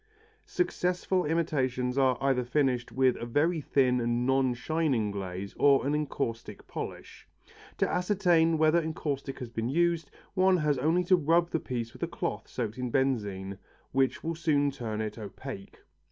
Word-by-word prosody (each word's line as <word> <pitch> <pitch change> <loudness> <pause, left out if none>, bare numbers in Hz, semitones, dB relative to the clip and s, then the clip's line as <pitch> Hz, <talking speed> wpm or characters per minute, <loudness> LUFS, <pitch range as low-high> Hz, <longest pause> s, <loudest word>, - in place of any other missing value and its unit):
Successful 180 - 0
imitations 130 -6 0
are 130 -2 +3
either 135 -2 +1
finished 125 -1 0
with 130 -1 +3
a - - -5
very 155 +7 +1
thin 125 -3 +2
and 120 +1 0
non 130 -1 +2
shining 135 -6 0
glaze 95 0 -5
or 140 -2 +5
an 145 - +1
encaustic 135 -6 -3
polish. - - -8 0.5
To - - +2
ascertain 175 -4 +2
whether 160 +2 +4
encaustic 145 -4 -4
has 125 -3 -6
been 115 +1 -2
used, 170 0 +1 0.2
one 190 -1 +4
has 150 -4 +1
only 165 +6 +2
to 185 +1 +5
rub 170 +1 +2
the 165 - 0
piece 120 -4 -4
with - - -14
a - - 0
cloth - - -4
soaked 115 0 -4
in 125 -1 -2
benzine, 105 -8 -1 0.3
which 135 0 +1
will 165 - -1
soon 150 -3 +1
turn 110 -5 -4
it 110 +1 -4
opaque. 105 0 -8
135 Hz, 160 wpm, -29 LUFS, 120-160 Hz, 0.5 s, or